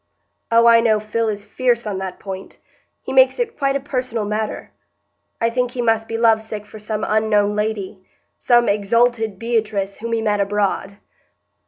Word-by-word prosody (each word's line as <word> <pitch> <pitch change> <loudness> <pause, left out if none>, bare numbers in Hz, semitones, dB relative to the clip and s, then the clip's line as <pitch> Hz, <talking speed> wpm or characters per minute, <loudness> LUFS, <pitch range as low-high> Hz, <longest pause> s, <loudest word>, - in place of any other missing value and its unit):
"Oh, 230 0 +5
I 230 0 +7
know 220 -2 +3
Phil 220 +2 -2
is 205 -1 -5
fierce 245 -2 0
on 200 -3 -3
that 190 -1 -5
point; 190 -1 -8 0.5
he 260 - -5
makes 260 -1 +5
it 470 -2 -2
quite 275 -1 0
a - - +1
personal 255 -5 -3
matter. 215 +1 -3 0.7
I 230 0 +1
think 250 +1 0
he 245 0 -4
must 225 -1 +1
be 225 - -3
love 225 -1 +4
sick 215 -1 -7
for 215 - -12
some 215 0 -3
unknown 210 -1 +2
lady,—some 215 +3 -1
exalted 220 +1 +1
Beatrice 215 -3 -1
whom 230 +1 -4
he 225 - 0
met 210 -2 +1
abroad." 200 0 -1
220 Hz, 170 wpm, -20 LUFS, 210-235 Hz, 0.7 s, I